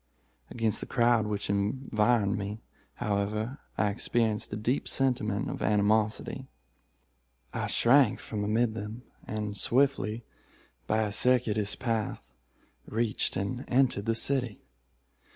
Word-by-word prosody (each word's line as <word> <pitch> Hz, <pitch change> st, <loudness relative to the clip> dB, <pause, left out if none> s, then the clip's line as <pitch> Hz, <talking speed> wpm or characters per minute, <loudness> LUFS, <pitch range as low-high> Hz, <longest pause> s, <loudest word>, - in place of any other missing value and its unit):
Against 115 Hz, -3 st, +1 dB
the -, -, -4 dB
crowd 120 Hz, -3 st, +3 dB
which 105 Hz, -1 st, -3 dB
environed 105 Hz, 0 st, +1 dB
me, 105 Hz, +2 st, -5 dB, 0.3 s
however, 105 Hz, +5 st, -2 dB, 0.2 s
I 105 Hz, -, +2 dB
experienced 110 Hz, 0 st, 0 dB
a -, -, -2 dB
deep 120 Hz, +6 st, -1 dB
sentiment 120 Hz, -6 st, 0 dB
of -, -, -5 dB
animosity. 110 Hz, +5 st, +1 dB, 1.1 s
I -, -, -2 dB
shrank 125 Hz, -1 st, +4 dB
from 105 Hz, -2 st, -4 dB
amid 110 Hz, +2 st, +1 dB
them, 110 Hz, +2 st, -6 dB, 0.2 s
and, 105 Hz, -1 st, -3 dB
swiftly, 120 Hz, 0 st, +1 dB, 0.6 s
by 110 Hz, +1 st, +2 dB
a 105 Hz, -, -2 dB
circuitous 110 Hz, -3 st, +2 dB
path, 115 Hz, -4 st, -2 dB, 0.7 s
reached 110 Hz, 0 st, -1 dB
and 110 Hz, +7 st, -3 dB
entered 125 Hz, -5 st, +2 dB
the 115 Hz, -, +2 dB
city. 125 Hz, -3 st, +1 dB
110 Hz, 115 wpm, -29 LUFS, 105-120 Hz, 1.1 s, shrank